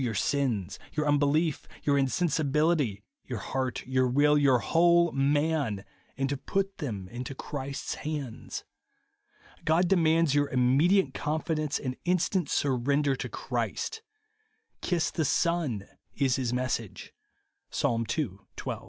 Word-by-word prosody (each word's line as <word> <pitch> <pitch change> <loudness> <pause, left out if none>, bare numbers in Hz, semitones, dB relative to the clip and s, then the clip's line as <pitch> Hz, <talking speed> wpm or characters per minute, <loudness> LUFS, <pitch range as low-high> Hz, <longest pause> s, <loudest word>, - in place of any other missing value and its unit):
your 120 -4 -1
sins, 110 -6 0
your 150 -1 0
unbelief, 145 +2 +2 0.2
your 145 - +3
insensibility, 150 - +1 0.2
your 125 - -3
heart, 130 +4 -3
your 130 0 +2
will, 145 +4 +4
your 140 -3 +5
whole 170 +5 +4
man, 140 -6 +1 0.3
and 135 0 0
to 140 - -1
put 195 +8 -2
them 105 - -4
into 125 +4 -6
Christ's 140 0 -4
hands. 145 -6 -5 1.0
God 165 +3 +3
de 195 - +4
mands 165 -3 +3
your 145 0 +2
immediate 135 +6 +3
confidence 155 0 -1
and 130 -2 -4
in 180 +1 +3
stant 180 -1 0
surrender 140 +1 +1
to - - -5
Christ. 445 0 -3 0.4
" 440 +1 -45
Kiss 175 -3 0
the 160 - -1
Son 145 - 0
" - - -42
is 130 -2 +3
his 125 -3 -1
message, 125 -4 -3 0.6
(Psa. 115 -1 0
ii. 150 -7 +1 0.3
12). - - -4
145 Hz, 135 wpm, -28 LUFS, 130-160 Hz, 1.0 s, your